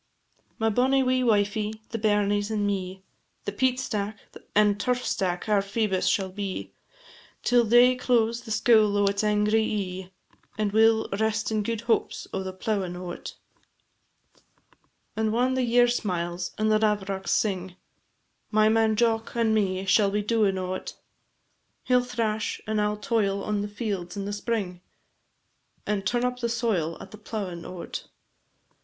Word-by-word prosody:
My 225 0 +1
bonny 265 +4 +3
wee 255 0 +2
wifie, 210 -1 +1
the 230 - -3
bairnies, 205 -1 +1
and 210 -2 0
me, 190 -1 -3 0.4
The - - -2
peat 255 +4 +1
stack, 210 -4 -3 0.4
and 205 -1 +4
turf 250 +2 0
stack 180 -1 -1
our 210 -2 +3
Phoebus 200 -1 -1
shall 190 -2 +1
be, 195 -1 -5 0.7
Till 245 -1 +4
day 240 +3 +6
close 235 -2 +1
the 230 - -12
scoul 215 -1 +4
o' 205 - +3
its 200 +1 +1
angry 210 +1 +2
ee, 190 -4 -3 0.5
And 210 -1 0
we 220 +2 +6
'll 220 0 +1
rest 220 0 0
in 215 -1 +1
gude 225 +1 -2
hopes 235 -1 0
o' - - -1
the 190 0 -4
plowin' 190 -1 -2
o't. 180 -1 -7 1.8
And 220 0 0
whan 250 +3 +2
the 260 - +1
year 245 0 +4
smiles, 175 -6 -2
and 215 0 +1
the 215 - +4
lavrocks 200 -3 -1
sing, 190 -3 0 0.7
My 215 0 +4
man 220 0 +3
Jock 225 0 0
and 230 -2 +2
me 190 -3 0
shall 200 +1 +4
be 205 +1 -1
doin' 210 -3 +2
o't; 185 0 -4 0.9
He 250 - +2
'll 250 - +5
thrash, 225 -3 -2
and 215 -1 0
I 210 - +2
'll 210 0 -2
toil 205 -2 0
on 210 -1 -1
the 205 - -3
fields 205 -4 -4
in 200 - -3
the 205 - -3
spring, 205 -4 -3 1.0
And 200 -2 -1
turn 240 +2 +1
up 250 0 -2
the 235 -1 -1
soil 215 -9 -1
at - - -11
the 215 - -11
plowin' 195 -6 -5
o't. 180 -2 -7
210 Hz, 160 wpm, -26 LUFS, 195-225 Hz, 1.8 s, day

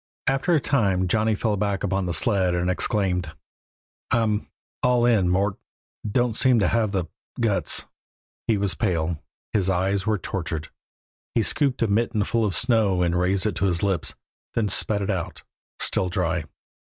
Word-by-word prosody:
After 135 +6 +2
a - - +4
time 100 -10 +1
Johnny 110 +3 +2
fell 105 0 0
back 100 -1 -1
upon 95 -1 0
the - - -1
sled 95 0 +2
and 90 +1 +1
exclaimed: 90 -4 0 0.8
"I'm 110 -3 +1 0.3
all 125 -1 +3
in, 105 -7 +3
Mort. 95 +2 +1 0.5
Don't 120 +1 +1
seem 130 0 +4
to 105 - +3
have 110 -3 +1
the 95 -4 -1 0.3
guts." 110 -4 +1 0.6
He 110 - +3
was 100 -3 +2
pale, 85 -5 -1 0.3
his 95 -3 +1
eyes 95 +2 0
were 110 -1 +2
tortured. 80 -4 -4 0.7
He 115 - +3
scooped 135 0 0
a - - +2
mitten 110 0 +1
full 115 +2 0
of 95 -5 -1
snow 105 -4 +2
and 85 0 +1
raised 95 +2 +1
it 110 - +1
to - - +1
his 90 -2 0
lips, 95 -5 0 0.4
then 110 -3 +1
spat 100 +1 +1
it 100 - -1
out, 90 -3 -4 0.3
still 90 - +1
dry. 85 -3 -1
100 Hz, 165 wpm, -24 LUFS, 90-110 Hz, 0.8 s, a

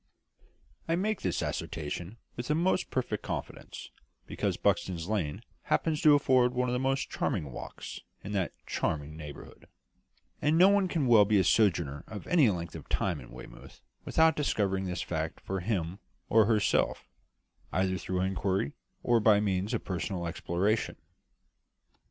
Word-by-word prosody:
I 165 - +2
make 210 +4 -1
this 90 - -1
assertion 85 +7 -4 0.2
with 120 - -5
the 150 - +2
most 180 +3 +1
perfect 120 -5 -2
confidence, - - -6 0.3
because - - -2
Buxton's 85 -2 0
Lane 90 -9 -2 0.2
happens 155 -2 +1
to 150 -1 +7
afford 130 -3 +3
one 125 0 +1
of 125 - -1
the 125 - 0
most 135 +1 0
charming 70 -3 -2
walks - - -8 0.2
in 100 - -6
that 95 -4 0
charming 75 0 -2
neighbourhood; 75 -2 -10 0.7
and 150 +2 +3
no 185 +3 +8
one 200 -1 +3
can 165 -6 0
well 115 -4 +7
be 105 +1 +3
a 95 - +4
sojourner 85 -8 +2 0.2
for - - -14
any 155 -9 +5
length 85 -4 -3
of - - -10
time 90 -6 0
in - - -12
Weymouth - - -12 0.2
without 160 -1 +3
discovering 100 -10 0
this 90 -1 -3
fact 80 -2 -3
for 95 0 -3
him 90 -2 -2 0.3
or 110 -1 +5
herself, 110 -3 +1 0.6
either 95 0 0
through 90 0 -2
inquiry 95 -4 0 0.3
or 120 -1 +4
by 105 -2 +5
means 100 0 0
of 115 - -2
personal 90 -1 -3
exploration. 90 +6 -1
100 Hz, 155 wpm, -30 LUFS, 90-125 Hz, 0.7 s, no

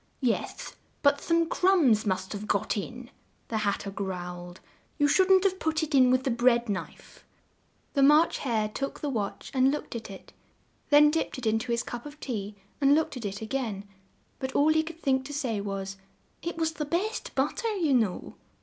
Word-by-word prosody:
"Yes, 245 -4 -2 0.3
but 285 0 +4
some 335 0 +2
crumbs 315 - +3
must 190 0 -1
have 210 +1 -6
got 200 - 0
in," 240 +4 -6 0.4
the 220 - -1
Hat 205 -2 0
ter 200 - -6
growled; 180 -2 -6 0.4
"you 290 -2 +3
shouldn't 375 +4 +5
have 380 -1 +1
put 315 0 0
it 310 0 -4
in 255 -2 +6
with 255 +1 +3
the 265 - 0
bread 240 0 +3
knife." 195 -2 -6 0.7
The 280 - +2
March 300 +4 +5
Hare 225 -5 0
took 275 +6 -5
the 290 - -2
watch 210 -5 -4
and 260 0 +4
looked 290 -3 -4
at 225 - -6
it; 195 - -12 0.6
then 295 0 +7
dipped 325 -2 -2
it 255 - -6
in 220 0 +2
to 235 +2 -4
his 235 0 0
cup 240 +4 -7
of 295 +1 -12
tea 210 -5 -4 0.3
and 280 +1 +6
looked 315 -2 0
at 240 -4 -6
it 200 +2 -4
a - - -3
gain; 220 -5 -3 0.5
but 265 0 -4
all 290 +2 +4
he 315 - +3
could 325 +1 -8
think 265 -4 +1
to 290 - -7
say 240 -8 -1
was, 195 -1 -5 0.4
"it 340 -1 -4
was 320 -1 0
the 300 -1 -4
best 375 +9 -2
but - - 0
ter, 465 - -2
you 330 -8 +1
know." 220 -7 0
255 Hz, 205 wpm, -28 LUFS, 210-300 Hz, 0.7 s, then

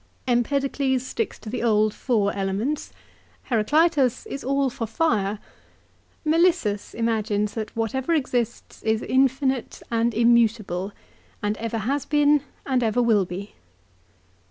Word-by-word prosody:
Empedocles 265 +1 +1
sticks 450 - -3
to - - -14
the 230 - -3
old 215 -2 +3
four 215 -6 0
elements. 200 +9 -2 0.6
Heraclitus 265 +3 +2
is 275 - -6
all 275 0 +1
for 230 -1 -4
fire. 215 -6 0 0.9
Melissus 320 - +2
imagines 215 -2 0
that 220 -2 -5
whatever 240 +6 -1
exists 245 -5 -2
is 220 0 0
infinite 265 -1 +1
and 230 0 +1
immutable, 225 -5 +2 0.5
and 205 +1 0
ever 230 0 -3
has 260 +6 -1
been 295 -1 +4 0.2
and 260 -2 +1
ever 225 0 +1
will 220 -5 +3
be. 185 +3 -7
235 Hz, 120 wpm, -24 LUFS, 215-270 Hz, 0.9 s, been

